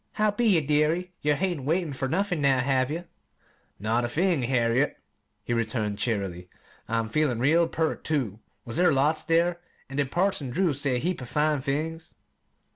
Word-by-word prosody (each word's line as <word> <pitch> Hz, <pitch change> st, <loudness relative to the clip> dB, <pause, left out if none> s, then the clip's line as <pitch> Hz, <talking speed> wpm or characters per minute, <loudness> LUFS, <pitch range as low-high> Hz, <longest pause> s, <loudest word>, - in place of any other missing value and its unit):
"How 215 Hz, 0 st, +2 dB
be 230 Hz, +3 st, 0 dB
ye, 180 Hz, -7 st, +4 dB
dearie? 155 Hz, +5 st, +1 dB
Yer 150 Hz, 0 st, +2 dB
hain't 175 Hz, -2 st, -1 dB
wanted 160 Hz, 0 st, 0 dB
fer 130 Hz, +1 st, -2 dB
nothin', 180 Hz, +2 st, 0 dB
now, 135 Hz, -2 st, +4 dB
have 130 Hz, 0 st, +1 dB
ye?" 155 Hz, -, -2 dB
she 175 Hz, -, -9 dB
asked. -, -, -30 dB, 0.7 s
"Not 110 Hz, +4 st, 0 dB
a 120 Hz, -, -1 dB
thing, 170 Hz, +2 st, +1 dB
Harriet," 120 Hz, +2 st, +1 dB, 0.5 s
he -, -, -2 dB
returned 110 Hz, -3 st, -1 dB
cheerily. 95 Hz, -6 st, -2 dB, 0.4 s
"I'm 115 Hz, 0 st, 0 dB
feelin' 140 Hz, 0 st, +1 dB
real 160 Hz, +6 st, +4 dB
pert, 160 Hz, -1 st, -2 dB
too. 125 Hz, -10 st, -1 dB, 0.3 s
Was 115 Hz, -, -5 dB
there 180 Hz, +1 st, +5 dB
lots 145 Hz, +3 st, +2 dB
there? 170 Hz, +1 st, +2 dB, 0.3 s
An' 135 Hz, -, -5 dB
did 140 Hz, -2 st, +1 dB
Parson 175 Hz, -6 st, 0 dB
Drew 170 Hz, +5 st, +1 dB
say 140 Hz, -1 st, 0 dB
a -, -, +1 dB
heap 175 Hz, +4 st, -2 dB
o' -, -, -5 dB
fine 150 Hz, +2 st, +1 dB
things?" 160 Hz, +5 st, -3 dB
145 Hz, 190 wpm, -26 LUFS, 125-165 Hz, 0.7 s, there